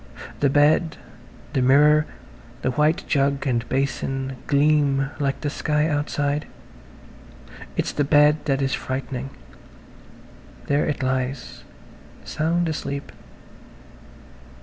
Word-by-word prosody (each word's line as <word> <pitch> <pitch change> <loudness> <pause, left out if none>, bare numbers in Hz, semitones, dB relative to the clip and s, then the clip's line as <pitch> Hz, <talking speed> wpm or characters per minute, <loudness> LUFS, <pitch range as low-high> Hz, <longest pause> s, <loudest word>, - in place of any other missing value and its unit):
The 140 - +3
bed, 150 +3 +3 0.6
the 130 - +1
mirror, 150 +4 +5 0.6
the 130 - +1
white 150 +5 +1
jug 140 0 +1
and 120 -3 -1
basin 135 0 -2
gleam 140 -2 +2
like 140 -2 -1
the 145 - -1
sky 150 0 0
outside. 145 -1 -1 1.3
It's - - 0
the 145 - 0
bed 150 +1 +5
that 135 -1 +1
is 135 - 0
frightening. 130 0 -4 1.4
There 145 +1 +1
it 145 -2 -2
lies, 130 - -3 0.6
sound 170 +2 0
asleep.. 140 -3 -4
140 Hz, 105 wpm, -23 LUFS, 135-150 Hz, 1.4 s, mirror